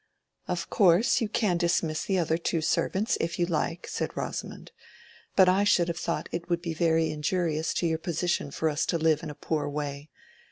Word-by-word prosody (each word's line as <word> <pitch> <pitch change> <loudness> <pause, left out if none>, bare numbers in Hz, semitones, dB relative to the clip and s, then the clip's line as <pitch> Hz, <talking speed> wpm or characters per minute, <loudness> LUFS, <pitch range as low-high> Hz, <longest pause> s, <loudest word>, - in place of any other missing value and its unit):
"Of 175 -1 -2
course 195 +7 +4
you 220 - -1
can 210 -6 +1
dismiss 165 -2 0
the 195 - 0
other 165 -1 +1
two 165 -1 0
servants, 190 +6 0
if 165 0 -2
you 175 - +2
like," 170 0 -2
said - - -4
Rosamond; - - -5 0.6
"but 190 -2 +6
I 190 +2 +4
should 175 -4 +3
have 170 0 -3
thought 170 - -2
it 170 +1 -5
would 170 0 0
be 165 -2 -2
very 160 -1 +2
injurious 155 +1 -1
to - - 0
your 160 -1 0
position 170 -2 -1
for 160 +3 -1
us 150 0 0
to 170 - +1
live 160 -2 +2
in - - -6
a 150 - -7
poor 150 -2 -2
way. 145 0 -5
170 Hz, 200 wpm, -27 LUFS, 155-180 Hz, 0.6 s, but